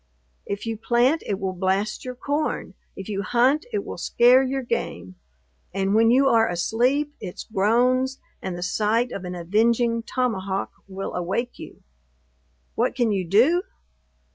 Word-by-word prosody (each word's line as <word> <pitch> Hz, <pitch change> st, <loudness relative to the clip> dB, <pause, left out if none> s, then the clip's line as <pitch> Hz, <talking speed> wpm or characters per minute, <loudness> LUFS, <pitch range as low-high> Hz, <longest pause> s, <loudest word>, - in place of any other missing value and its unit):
If 200 Hz, +2 st, -4 dB
you 225 Hz, -1 st, -3 dB
plant, 245 Hz, +7 st, +2 dB
it 200 Hz, -, -1 dB
will 190 Hz, -1 st, -2 dB
blast 190 Hz, +3 st, -1 dB
your 255 Hz, -1 st, -6 dB
corn; 290 Hz, +4 st, -2 dB, 0.2 s
if 195 Hz, -, -8 dB
you 200 Hz, -2 st, -2 dB
hunt, 255 Hz, -, +2 dB
it 415 Hz, -3 st, -2 dB
will -, -, -7 dB
scare 245 Hz, +2 st, +5 dB
your 270 Hz, 0 st, -2 dB
game; 90 Hz, -, -3 dB, 0.6 s
and 195 Hz, 0 st, 0 dB
when 225 Hz, +1 st, +5 dB
you 265 Hz, +3 st, +4 dB
are 225 Hz, -3 st, +4 dB
asleep, 245 Hz, +11 st, 0 dB
its 185 Hz, -4 st, -7 dB
groans, 250 Hz, +6 st, +1 dB, 0.2 s
and 185 Hz, -2 st, -4 dB
the 175 Hz, -, -4 dB
sight 220 Hz, +6 st, +1 dB
of 190 Hz, -, -6 dB
an 180 Hz, 0 st, -5 dB
avenging 230 Hz, +6 st, +1 dB
tomahawk, 200 Hz, -6 st, -2 dB, 0.2 s
will 195 Hz, 0 st, -5 dB
awake 195 Hz, +8 st, -3 dB
you! -, -, -11 dB, 0.9 s
What -, -, 0 dB
can 240 Hz, -4 st, +1 dB
you 190 Hz, -3 st, -1 dB
do? 255 Hz, -, +4 dB
225 Hz, 155 wpm, -24 LUFS, 195-255 Hz, 0.9 s, scare